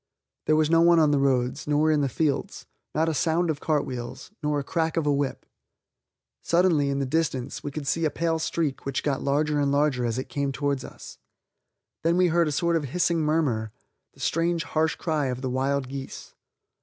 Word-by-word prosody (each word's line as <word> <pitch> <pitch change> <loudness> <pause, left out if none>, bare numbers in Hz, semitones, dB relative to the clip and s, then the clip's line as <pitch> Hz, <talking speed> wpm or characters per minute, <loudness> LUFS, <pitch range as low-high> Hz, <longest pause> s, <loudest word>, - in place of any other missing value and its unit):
There 155 - +4
was 155 0 +2
no 165 0 +5
one 170 0 +6
on 155 -2 +4
the 145 - +2
roads, 130 -2 0
nor 150 +1 +3
in 150 -1 +2
the 140 - +1
fields, 150 +2 -2 0.3
not 160 +1 +2
a 160 - +1
sound 165 +3 +1
of 145 - -5
cart 150 -2 0
wheels, 120 +4 -7
nor 150 -1 0
the 145 - -2
crack 160 +3 -1
of 165 - +1
a 145 - +3
whip. 140 -1 -2 1.0
Suddenly, 170 -5 +2
in 140 - -1
the 140 - 0
distance, 135 -3 -2
we 145 - -3
could 145 0 -6
see 165 +4 0
a - - +3
pale 165 +1 -1
streak 160 -3 -2
which 135 -2 -2
got 140 -2 -1
larger 150 +1 +1
and 140 -1 +1
larger 140 -3 +2
as 120 0 -1
it 130 - -4
came 140 -1 -2
towards 140 -1 -1
us. - - -11 0.8
Then 170 +2 +2
we 180 -1 +4
heard 170 0 +3
a - - -1
sort 170 +4 +1
of 150 - -3
hissing 170 +4 0
murmur, 145 -9 0 0.4
the - - -21
strange, 165 0 0
harsh 160 0 0
cry 155 -4 -1
of 125 0 -3
the 130 -2 -2
wild 135 +1 0
geese. 135 0 -8
150 Hz, 210 wpm, -26 LUFS, 140-160 Hz, 1.0 s, one